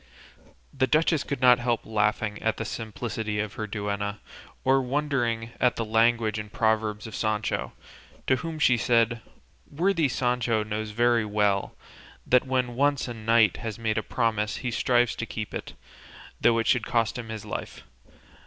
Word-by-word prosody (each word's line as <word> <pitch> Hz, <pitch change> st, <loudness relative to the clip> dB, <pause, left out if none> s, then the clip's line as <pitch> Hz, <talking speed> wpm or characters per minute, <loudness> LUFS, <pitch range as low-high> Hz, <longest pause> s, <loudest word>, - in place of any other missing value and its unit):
The 130 Hz, -1 st, +1 dB
duchess 155 Hz, +1 st, +2 dB
could 140 Hz, -2 st, -4 dB
not 125 Hz, -1 st, +6 dB
help 120 Hz, -1 st, -1 dB
laughing 105 Hz, 0 st, 0 dB
at 110 Hz, 0 st, 0 dB
the 115 Hz, -, -3 dB
simplicity 110 Hz, -1 st, -4 dB
of 105 Hz, -1 st, -3 dB
her 110 Hz, -, -4 dB
duenna, 105 Hz, 0 st, -3 dB, 0.5 s
or 135 Hz, +1 st, +4 dB
wondering 125 Hz, -4 st, -1 dB
at 125 Hz, -, +3 dB
the 115 Hz, -, -2 dB
language 115 Hz, 0 st, +2 dB
and 105 Hz, -1 st, -7 dB
proverbs 110 Hz, -1 st, 0 dB
of 110 Hz, -, -8 dB
Sancho, 110 Hz, -1 st, -1 dB, 0.5 s
to 130 Hz, -, +3 dB
whom 160 Hz, +1 st, -5 dB
she 125 Hz, -5 st, +4 dB
said, 115 Hz, 0 st, +2 dB, 0.5 s
"Worthy 165 Hz, 0 st, +1 dB
Sancho 120 Hz, -3 st, 0 dB
knows 105 Hz, 0 st, -4 dB
very 120 Hz, +1 st, +2 dB
well 105 Hz, -2 st, 0 dB, 0.5 s
that 125 Hz, +1 st, +3 dB
when 130 Hz, -2 st, 0 dB
once 140 Hz, +2 st, +1 dB
a 120 Hz, -, -4 dB
knight 115 Hz, -2 st, +3 dB
has 110 Hz, -2 st, -5 dB
made 110 Hz, -1 st, 0 dB
a -, -, -2 dB
promise 110 Hz, -2 st, -1 dB
he 125 Hz, -, 0 dB
strives 120 Hz, 0 st, +2 dB
to 115 Hz, -, -4 dB
keep 110 Hz, -1 st, -5 dB
it, -, -, -6 dB, 0.7 s
though 115 Hz, -1 st, +4 dB
it 115 Hz, -, 0 dB
should 120 Hz, 0 st, +2 dB
cost 115 Hz, -2 st, +1 dB
him 115 Hz, -2 st, -7 dB
his 110 Hz, -2 st, -6 dB
life. -, -, -6 dB
115 Hz, 165 wpm, -26 LUFS, 110-125 Hz, 0.7 s, not